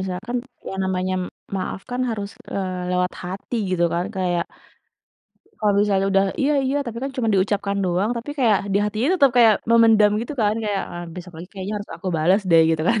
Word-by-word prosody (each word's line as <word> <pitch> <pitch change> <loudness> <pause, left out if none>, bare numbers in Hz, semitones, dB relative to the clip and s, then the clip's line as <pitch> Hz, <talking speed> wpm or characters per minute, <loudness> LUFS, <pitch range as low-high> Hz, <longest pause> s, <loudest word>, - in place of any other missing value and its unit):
misalkan 190 +6 -4 0.3
yang 190 0 -4
namanya 185 0 -1 0.4
maaf 185 0 -4
kan 245 - -2
harus 205 -2 -3 0.2
eee, 185 -2 -3
lewat 180 0 +1
hati, 195 +6 -5
gitu 175 -2 +2
kan. 175 +1 0
Kayak 175 -2 0 1.2
kalau 210 -1 +3
misalnya 195 -2 +2
udah, 195 0 +4 0.2
"Iya 285 +2 +2
iya," 275 +2 0
tapi 235 0 -5
kan 275 - -2
cuma 230 -3 0
diucapkan 200 +1 0
doang, 185 +5 0
tapi 235 +5 -5
kayak 225 -6 +4
ha 200 - -7
di - - +4
hatinya 215 +5 -1
tetap 280 -8 +5
kayak 225 -3 +7 0.2
memendam, 225 -3 +6
gitu 240 +6 -5
kan. 210 0 +2
Kayak, 205 -2 -1
"Wah, 175 0 -6
besok 180 0 -9
lagi 175 +3 -9
kayaknya 195 +2 -5
harus 205 - -10
aku 195 - -5
balas 180 +7 +3
deh," 165 -1 +7
gitu 160 -1 0
kan. 230 -1 +3
200 Hz, 200 wpm, -22 LUFS, 185-225 Hz, 1.2 s, kayak